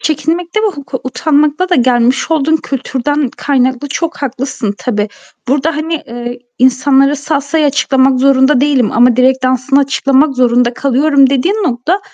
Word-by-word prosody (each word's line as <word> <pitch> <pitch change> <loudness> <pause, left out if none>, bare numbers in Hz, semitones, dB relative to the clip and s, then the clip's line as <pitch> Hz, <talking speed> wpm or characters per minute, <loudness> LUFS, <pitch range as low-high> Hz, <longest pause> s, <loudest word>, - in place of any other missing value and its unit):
Çekinmekte 330 +6 -2
ve 440 - +1
huk 285 -9 -7
utanmakta 300 +5 0
da 360 - +2
gelmiş 250 +1 +1
olduğun 315 0 +2
kültürden 275 0 -3
kaynaklı 260 0 -1
çok 335 +4 -3
haklısın 255 -5 -3
tabii. 210 -4 -2 0.4
Burada, 290 +4 0
hani, 320 +2 -3
eee, 240 +1 -7 0.2
insanlara 270 +2 +3
salsayı 290 +1 -1
açıklamak 270 -2 +1
zorunda 265 0 +3
değilim 275 -5 +1
ama 240 +1 +3
direk 260 0 +2
dansını 255 +2 +1
açıklamak 275 +1 +1
zorunda 245 -1 +2
kalıyorum 275 +1 +2
dediğin 280 +9 0
nokta 320 +7 -1
270 Hz, 140 wpm, -13 LUFS, 255-295 Hz, 0.4 s, insanlara